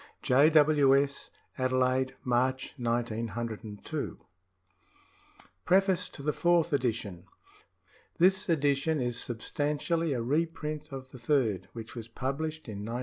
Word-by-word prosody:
J. 140 +5 +5
W. 150 -3 +5
S. 140 0 -2 0.3
Adelaide, 130 0 +1
March 130 +2 0
1902 115 +1 -3 1.5
PREFACE 190 0 +3
TO 140 - -10
THE 150 +1 0
FOURTH 170 -2 +2
EDITION 110 -9 -1 0.9
This 190 +2 +3
edition 145 0 +2
is 120 -1 -1
substantially 150 +6 -1
a 120 -3 -2
reprint 150 +2 -2
of 130 -1 -8
the 130 - -11
third, 115 - +1
which 115 -1 -8
was 115 -2 -7
published 145 +6 -4
in 105 -3 -6
1910. 115 +4 -4
135 Hz, 115 wpm, -30 LUFS, 120-155 Hz, 1.5 s, J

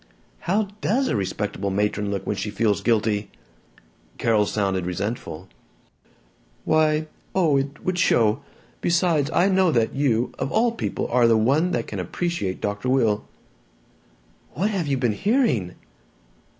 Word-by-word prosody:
"How 205 +2 +1
does 260 +5 +1
a - - 0
respectable 100 0 -2
matron 105 +1 0
look 100 -1 -3
when - - -1
she 100 +2 -3
feels 105 -1 0
guilty?" 105 -2 +1 0.9
Carol 110 -3 +2
sounded 95 -3 -1
resentful. 90 -2 -4 1.2
"Why 155 0 +2 0.3
Oh, 165 -6 +3
it 140 +2 -4
would 180 -1 0
show! 115 -7 +3 0.4
Besides! 170 -4 +2
I 175 +3 +3
know 190 -3 +3
that 115 -5 +1
you, 125 -4 +1
of - - -2
all 230 +2 +3
people, 230 - -3
are 120 -1 +4
the 115 -1 +4
one 140 +11 +2
that - - -1
can - - -6
appreciate 170 - -3
Dr. 105 +4 -2
Will." 115 -5 +1 1.3
"What 195 +9 0
have 185 -7 -2
you 140 -1 +1
been 120 -4 +1
hearing?" 200 - +1
120 Hz, 140 wpm, -23 LUFS, 105-170 Hz, 1.3 s, are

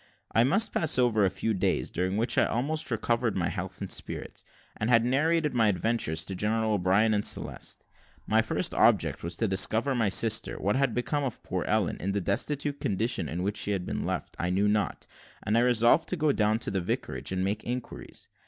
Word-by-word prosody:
I 115 - +4
must 195 - +2
pass 155 -5 +2
over 115 -5 +3
a - - +3
few 95 +4 -2
days, 95 - 0
during 95 +3 -1
which 115 +3 +1
I - - +4
had - - +1
almost 150 +7 -2
recovered 115 -1 0
my 85 -2 0
health 95 -2 -6
and - - -5
spirits; - - -4 0.3
and 110 - -2
had 115 -1 +4
narrated 150 +3 +1
my 115 -3 +3
adventures 95 -5 0
to 95 - -4
General 110 +3 0
O'Brien 100 +3 +2
and 105 -1 0
Celeste. - - -4 0.4
My 110 +1 +3
first 110 - -1
object - - +3
was 85 +1 -5
to 115 - 0
discover 110 +7 +2
my 115 -5 +1
sister. 110 +3 +2
What 100 +2 0
had 135 -3 +1
become 145 +4 -1
of 130 -4 -5
poor - - -3
Ellen, - - 0
in 95 +2 -2
the 100 - 0
destitute 140 - -1
condition 105 +4 -1
in 90 +2 -3
which 100 +2 -2
she 105 - +1
had 90 -2 -3
been - - -3
left, - - -4
I 90 - -1
knew 95 +3 +1
not; 105 -3 -1 0.4
and 105 - 0
I 115 - +4
resolved 120 +4 +3
to 185 - -1
go 155 -1 +2
down 110 -3 +2
to - - -2
the 95 - -1
vicarage, 85 - -3
and 95 0 -1
make 105 +3 -2
inquiries. 125 +1 -6
110 Hz, 215 wpm, -28 LUFS, 95-125 Hz, 0.4 s, I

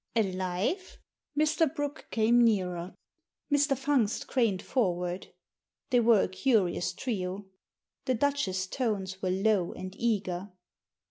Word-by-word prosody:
•'Alive?" 190 - -1 0.4
Mr. 310 0 +3
Brooke 290 0 -4
came 235 +2 +4
nearer. 185 -5 0 0.6
Mr. 285 -1 +3
Fungst 265 -6 +1
craned 225 -8 +1
for 210 -10 +1
ward. 180 +1 -4 0.6
They 245 - +5
were 230 -3 +5
a - - 0
curious 190 -3 +1
trio. 190 -2 -3 0.6
The 255 - +1
Duchess's 230 -8 0
tones 195 -4 -2
were 185 - 0
low 190 -1 +1
and 185 0 -7
eager. 195 -4 -1
210 Hz, 120 wpm, -29 LUFS, 185-255 Hz, 0.6 s, They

